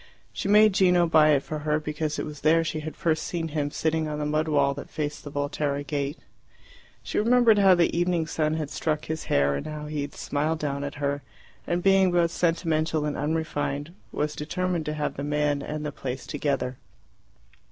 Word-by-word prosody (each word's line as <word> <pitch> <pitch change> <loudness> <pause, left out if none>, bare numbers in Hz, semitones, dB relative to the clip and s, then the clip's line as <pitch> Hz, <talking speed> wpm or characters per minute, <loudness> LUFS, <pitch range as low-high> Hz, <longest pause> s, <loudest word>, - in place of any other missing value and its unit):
She - - -3
made 210 0 +6
Gino 180 -2 +4
buy 155 -2 +5
it 140 -2 +3
for 155 - -5
her, 150 0 0
because 150 0 -3
it - - -2
was 150 -1 -8
there 165 +2 +4
she 155 -1 -3
had 155 0 -6
first 160 -2 0
seen 165 -2 -3
him 145 -1 -1
sitting 160 +1 -1
on 150 -1 -3
the 150 - -2
mud 155 +2 0
wall 140 -2 +2
that 140 - -8
faced 150 -1 -4
the 145 - -7
Volterra 145 0 -2
gate. 145 +1 -3 0.9
She - - -1
remembered 230 -1 +5
how 195 -2 +6
the 170 -1 +2
evening 175 -1 +1
sun 155 0 0
had 155 -3 -3
struck 155 -2 -2
his 160 0 -4
hair, 70 0 +2
and 70 - -4
how 150 -1 -6
he 150 -1 -3
had 140 - -6
smiled 150 +3 -1
down 140 -2 -3
at 140 0 -5
her, 145 0 -2 0.5
and 175 0 -1
being 195 -1 +5
both 170 -1 +2
sentimental 160 -3 0
and 150 - -2
unrefined, 150 0 -2 0.2
was 150 0 -2
determined 175 +1 -2
to 150 - -2
have 150 -1 -3
the 140 - -3
man 145 -1 0
and 150 +1 -5
the 150 - -2
place 130 -1 -5
together. 140 -3 -2
155 Hz, 205 wpm, -26 LUFS, 145-165 Hz, 0.9 s, made